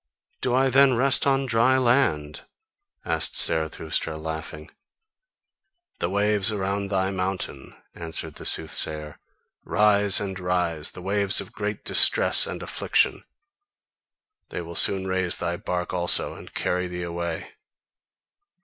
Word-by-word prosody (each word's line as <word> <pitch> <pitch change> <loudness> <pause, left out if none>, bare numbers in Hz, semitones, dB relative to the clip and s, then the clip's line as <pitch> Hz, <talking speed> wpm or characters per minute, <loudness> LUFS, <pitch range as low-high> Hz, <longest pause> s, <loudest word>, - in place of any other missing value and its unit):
"Do 125 -1 0
I 135 0 +2
then 135 0 +5
rest 135 +3 +2
on 135 0 +1
dry 120 +2 +2
land?" 120 - 0 0.6
asked 80 -2 -1
Zarathustra, 80 0 -1
laughing. 80 0 -7 1.3
"The 85 - -2
waves 105 +1 +2
around 100 -1 -2
thy 95 -1 0
mountain," 95 0 -4 0.2
answered 80 -1 -5
the - - -10
soothsayer, 75 -1 -3 0.4
"rise 105 -2 +3
and 95 -2 -5
rise, 90 -4 -1
the 90 - -10
waves 100 0 +4
of - - -8
great 105 0 -5
distress - - +5
and - - -6
affliction: - - 0 1.3
they - - -5
will 85 +1 -9
soon 95 +2 +4
raise 95 -2 -1
thy 85 0 -3
bark 90 +1 -4
also 90 -1 +1
and - - -13
carry 90 0 -2
thee 90 0 -6
away." 85 -1 -5
95 Hz, 125 wpm, -24 LUFS, 85-105 Hz, 1.3 s, then